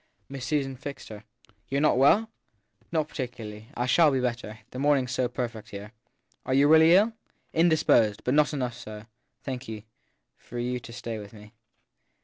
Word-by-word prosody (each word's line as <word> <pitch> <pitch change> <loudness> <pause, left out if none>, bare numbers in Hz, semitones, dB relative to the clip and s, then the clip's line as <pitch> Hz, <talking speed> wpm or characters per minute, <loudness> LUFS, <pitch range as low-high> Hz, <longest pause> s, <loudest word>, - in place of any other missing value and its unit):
7 - - -42
Miss 135 -2 -6
Susan 135 -3 -1
fixed 140 +2 -8
her. 105 - -7 0.3
l - - -29 0.2
You 135 - -3
re - - +1
not 150 - +4
well? 140 - +5
7 225 - -10 0.6
Not 155 -2 0
particularly. 115 -6 -7
I 125 - 0
shall 155 +5 +5
be 135 -2 +1
better 120 -3 -3
the 125 - -6
morning 145 -1 +3
s 125 - -6
so 130 -1 +1
perfect 115 -3 -5
here. 105 +1 -8 0.5
Are 130 - 0
you 140 +1 +5
really 160 +2 +7
ill? 215 +4 +4 0.4
7 - - -2
Indisposed; 115 - +3
but 125 - 0
not 150 0 +4
enough 125 -5 -2
so, 110 -3 -9 0.4
thank 130 -1 -5
you, 110 -2 -7 0.5
for 120 - -10
you 125 +1 -2
to 115 - -11
stay 115 -1 -5
with 105 0 -11
me. 105 0 -14
125 Hz, 200 wpm, -27 LUFS, 115-145 Hz, 0.6 s, really